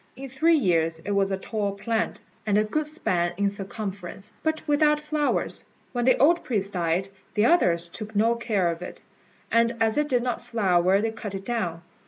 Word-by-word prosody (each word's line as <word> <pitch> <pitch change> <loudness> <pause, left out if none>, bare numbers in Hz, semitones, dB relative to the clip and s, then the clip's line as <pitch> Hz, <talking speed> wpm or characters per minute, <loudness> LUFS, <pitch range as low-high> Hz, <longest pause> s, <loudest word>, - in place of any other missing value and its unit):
In 270 +2 -8
three 320 +6 +3
years 165 - +1
it 165 +5 -6
was 200 -1 +2
a 195 - -1
tall 205 0 -2
plant, 225 +3 -2 0.3
and 205 -1 +3
a 210 - +4
good 295 +8 -1
span 175 - 0
in 200 0 +1
circumference, 200 -1 -6
but 315 0 -2
without 300 0 +3
flowers. 300 -1 -1 0.3
When 240 -1 0
the 255 - +5
old 335 +5 +4
priest 200 -5 -1
died, 175 +2 0 0.3
the 210 +1 +3
others 175 - +3
took 215 +5 -4
no 225 +3 +4
care 215 -7 0
of 165 +1 -7
it; 180 - -8 0.5
and 230 0 +3
as 225 +4 +2
it 295 0 0
did 245 -3 +2
not 245 -1 -2
flower 190 -3 +2
they 225 0 0
cut 215 -3 -6
it 195 0 -6
down. 180 -9 -2
215 Hz, 195 wpm, -25 LUFS, 190-250 Hz, 0.5 s, the